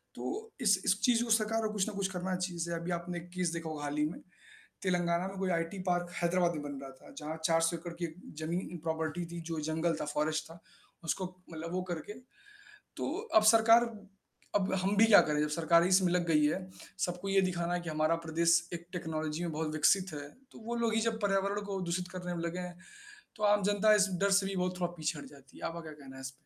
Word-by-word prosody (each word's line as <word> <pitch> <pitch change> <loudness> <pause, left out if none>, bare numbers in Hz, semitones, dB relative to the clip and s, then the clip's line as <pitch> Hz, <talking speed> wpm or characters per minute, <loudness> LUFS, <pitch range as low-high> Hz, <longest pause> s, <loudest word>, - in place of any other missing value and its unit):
तो 445 +1 -5
इस 200 -5 +4
इस 200 - +3
चीज़ 235 -1 +4
को 240 - -5
सरकार 225 0 +3
को - - -4
कुछ 205 -1 +1
ना 215 - -4
कुछ 200 -1 0
करना 185 0 -2
चाहिए 180 -1 -3
जैसे 170 +1 -2
अभी 170 +2 -4
आपने 175 0 -3 0.2
केस 180 -2 0
देखा 165 -1 -4
होगा 150 -2 -5
हाल 145 0 -3
ही 150 - +3
में। 155 - -4 0.6
तेलंगाना 175 -1 +1
में 195 - -8
कोई 190 -1 0
आईटी 165 +4 -4
पार्क 175 0 0
हैदराबाद 175 0 +2
में 150 - -4
बन 145 -1 -6
रहा 135 - -7
था 135 - -16
जहाँ 155 +1 -5
400 165 +1 +3
एकड़ 170 +1 -7
की - - +2 0.4
ज़मीन 175 +1 -3
प्रॉपर्टी 160 +1 -2
थी, 170 0 -7
जो 165 -1 -4
जंगल 165 +1 +1
था, - - -1
फॉरेस्ट 150 +1 -1
था, 165 - -11 0.5
उसको 185 +3 -2 0.2
मतलब 165 +1 -6
वो 185 0 -1
करके। 205 +7 -6 0.8
तो - - -2 0.2
अब 220 - +8
सरकार 230 +1 +6 0.7
अब 195 -2 +1
हम 195 +2 +1
भी 215 - +7
क्या 215 -2 +9
करें, 150 -1 +1
जब 150 - +1
सरकार 165 +2 +4
ही 175 - +2
इस 190 +1 +6
में 175 -2 +2
लग 180 -1 +1
गई 155 -2 +4
है, 150 - +1 0.5
सबको 180 +2 -5
ये 195 0 +4
दिखाना 175 -1 0
कि - - -2
हमारा 155 +1 +2
प्रदेश 165 +1 +3 0.2
एक 170 0 -7
टेक्नोलॉजी 160 -2 -3
में 170 -2 -2
बहुत 155 0 -2
विकसित 185 +4 +3
है, 145 -1 -6 0.2
तो - - -12
वो 235 - -2
लोग 225 -1 +2
ही 225 - +3
जब 225 0 0
पर्यावरण 200 0 +1
को 195 -1 -3
दूषित 180 0 -2
करने 180 -1 -4
में 170 - -3
लगे 170 +1 -3
हैं। 180 -1 -6 0.6
तो 210 - -8
आम 205 0 +4
जनता 205 +2 +4
इस 205 -1 +4
डर 200 0 +3
से 195 0 +4
भी 195 0 -3
बहुत 180 0 -1
थोड़ा 175 -1 0
पीछे 155 -1 -2
हट 145 - -8
जाती 140 -2 -16
है। - - -8
आपका 170 +1 -4
क्या 160 -2 -9
कहना 140 -3 -12
है - - -9
इस 130 0 -5
पे? - - -19
175 Hz, 240 wpm, -32 LUFS, 160-195 Hz, 0.8 s, क्या